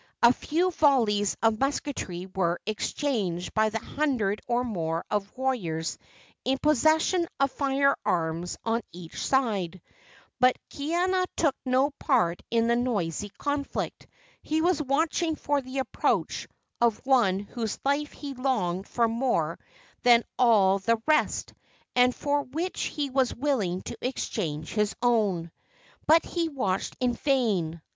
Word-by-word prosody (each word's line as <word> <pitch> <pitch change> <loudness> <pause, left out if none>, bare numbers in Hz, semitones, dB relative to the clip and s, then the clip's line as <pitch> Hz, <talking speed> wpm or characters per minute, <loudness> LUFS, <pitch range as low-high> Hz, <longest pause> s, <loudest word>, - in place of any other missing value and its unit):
A 235 +1 +8
few 345 +8 0
volleys 230 - +3
of 225 -1 +3
musketry 270 -10 -2
were 175 -2 0
exchanged 210 -5 -2
by 215 0 +3
the 220 - -2
hundred 225 -5 -1
or 245 0 +1
more 165 -8 -2
of 205 -1 -1
warriors 180 -12 -2 0.4
in 265 +1 +1
possession 315 +5 +3
of 275 -1 +2
fire 275 0 +2
arms 165 +1 -1
on 230 +1 +1
each 175 -2 -7
side, 205 -9 0 0.6
but 255 0 +5
Kaiana 355 +5 0
took 295 -5 +2
no 260 +3 +3
part 170 0 +2
in 230 -1 +2
the 235 0 +3
noisy 205 -6 -1
conflict. 285 -1 -3 0.3
He 310 +1 -1
was 345 0 +2
watching 315 +3 +1
for 290 -1 0
the 260 +1 -7
approach 265 - 0 0.3
of 235 -3 +3
one 240 -9 +4
whose 215 +2 -4
life 285 +2 +1
he 285 -2 -7
longed 210 -9 -1
for 235 -1 +1
more 225 -9 0 0.4
than 240 -1 +6
all 200 -6 +4
the 230 +4 +2
rest, 310 -1 +1 0.4
and 250 0 +4
for 290 0 0
which 320 +8 -3
he 285 -3 -3
was 260 -1 +1
willing 225 -10 -1
to - - -6
exchange 165 - -3
his 210 -1 0
own. 200 -9 +2 0.6
But 325 +2 +6
he 335 -2 -1
watched 200 -10 -2
in 250 -1 +1
vain. 205 - 0
245 Hz, 135 wpm, -27 LUFS, 195-280 Hz, 0.6 s, A